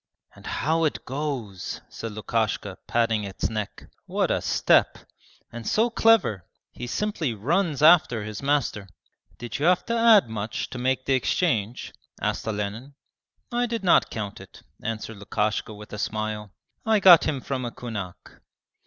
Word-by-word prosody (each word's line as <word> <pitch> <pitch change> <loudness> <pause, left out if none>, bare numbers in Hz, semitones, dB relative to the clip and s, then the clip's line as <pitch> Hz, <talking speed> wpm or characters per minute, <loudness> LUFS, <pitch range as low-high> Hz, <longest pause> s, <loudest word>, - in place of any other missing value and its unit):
'And - - -13
how 160 +2 0
it 155 - -2
goes!' 130 -9 -4
said 115 -2 -7
Lukashka, 110 -2 -2
patting 115 -2 +1
its 95 -1 -3
neck. 105 -2 -5 0.2
'What - - 0
a - - +1
step! - - +3 0.5
And 120 -1 -7
so 230 +2 +2
clever 225 - +3 0.3
he 120 - -7
simply 160 - -2
runs 150 - 0
after 155 -9 +6
his 105 -1 -6
master.' 135 -8 0 0.5
'Did 120 +2 -6
you 150 - +2
have 180 0 +3
to 235 - -1
add 230 - +6
much 110 -1 -4
to 125 - -5
make 130 +1 0
the 135 - +2
exchange?' 125 - 0 0.3
asked - - -2
Olenin. 110 +6 -4 0.6
'I 240 0 +1
did 230 -2 -3
not 180 - +4
count 105 -3 -5
it,' - - -15 0.2
answered 115 -1 -5
Lukashka 105 +2 -2
with 105 0 -11
a 105 - -5
smile. 110 -1 -3 0.3
'I 220 -1 +3
got 175 -4 +8
him 140 - -1
from 130 0 -4
a 120 - -2
kunak.' 105 -7 -8
120 Hz, 155 wpm, -25 LUFS, 105-155 Hz, 0.6 s, got